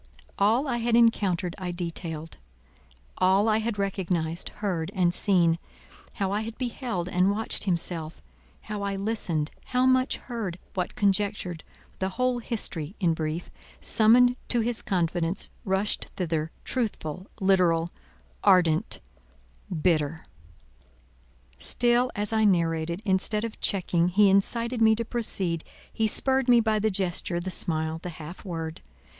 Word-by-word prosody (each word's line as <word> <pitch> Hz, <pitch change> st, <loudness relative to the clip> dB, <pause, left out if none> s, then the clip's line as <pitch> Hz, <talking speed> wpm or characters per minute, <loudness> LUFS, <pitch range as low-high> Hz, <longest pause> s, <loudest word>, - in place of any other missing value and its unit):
All 225 Hz, +8 st, +3 dB
I 245 Hz, -3 st, 0 dB
had 235 Hz, 0 st, +1 dB
encountered 195 Hz, -7 st, +2 dB
I 185 Hz, -1 st, -4 dB
detailed, 165 Hz, -2 st, -5 dB, 0.8 s
all 190 Hz, +3 st, +4 dB
I 220 Hz, 0 st, +3 dB
had 220 Hz, -1 st, -2 dB
recognised, 180 Hz, -4 st, -2 dB
heard, 180 Hz, -4 st, -3 dB
and 175 Hz, -2 st, +2 dB
seen; 175 Hz, -4 st, +2 dB, 0.5 s
how 195 Hz, -1 st, -2 dB
I 205 Hz, +1 st, 0 dB
had 225 Hz, +1 st, -6 dB
beheld 240 Hz, -7 st, -3 dB
and 180 Hz, +1 st, +2 dB
watched 210 Hz, +1 st, -1 dB
himself: 170 Hz, -3 st, -2 dB, 0.4 s
how 210 Hz, -1 st, -5 dB
I 200 Hz, 0 st, -2 dB
listened, 195 Hz, -7 st, -1 dB
how 250 Hz, 0 st, +1 dB
much 255 Hz, 0 st, +3 dB
heard, 220 Hz, -8 st, -5 dB, 0.2 s
what 180 Hz, -2 st, -3 dB
conjectured; 195 Hz, -4 st, 0 dB, 0.4 s
the 190 Hz, -, 0 dB
whole 255 Hz, -1 st, +1 dB
history, 195 Hz, -8 st, -3 dB
in 175 Hz, -5 st, +2 dB
brief, 160 Hz, +1 st, -4 dB, 0.3 s
summoned 245 Hz, +3 st, +6 dB
to 240 Hz, -, +1 dB
his 230 Hz, -1 st, -1 dB
confidence, 175 Hz, -1 st, -1 dB
rushed 190 Hz, +2 st, 0 dB
thither, 160 Hz, -3 st, -1 dB
truthful, 190 Hz, -, -3 dB
literal, 180 Hz, -4 st, +2 dB, 0.5 s
ardent, 175 Hz, +1 st, +3 dB, 0.8 s
bitter. 160 Hz, -3 st, +1 dB, 1.3 s
Still 245 Hz, +1 st, +3 dB
as 210 Hz, +1 st, -1 dB
I 220 Hz, 0 st, +3 dB
narrated, 170 Hz, -1 st, +1 dB
instead 205 Hz, +2 st, +1 dB
of 230 Hz, -1 st, -6 dB
checking, 175 Hz, -3 st, +1 dB
he 195 Hz, +2 st, +4 dB
incited 230 Hz, +5 st, +1 dB
me 220 Hz, 0 st, +6 dB
to 230 Hz, +1 st, -3 dB
proceed 190 Hz, -8 st, 0 dB, 0.3 s
he 220 Hz, -1 st, +1 dB
spurred 265 Hz, +3 st, +2 dB
me 240 Hz, -1 st, +7 dB
by 220 Hz, -1 st, +1 dB
the 220 Hz, +1 st, +1 dB
gesture, 185 Hz, -3 st, -2 dB
the 185 Hz, +2 st, -4 dB
smile, 160 Hz, -2 st, 0 dB
the 180 Hz, -, -5 dB
half 165 Hz, +3 st, -9 dB
word. 165 Hz, -4 st, -5 dB
190 Hz, 135 wpm, -26 LUFS, 170-220 Hz, 1.3 s, me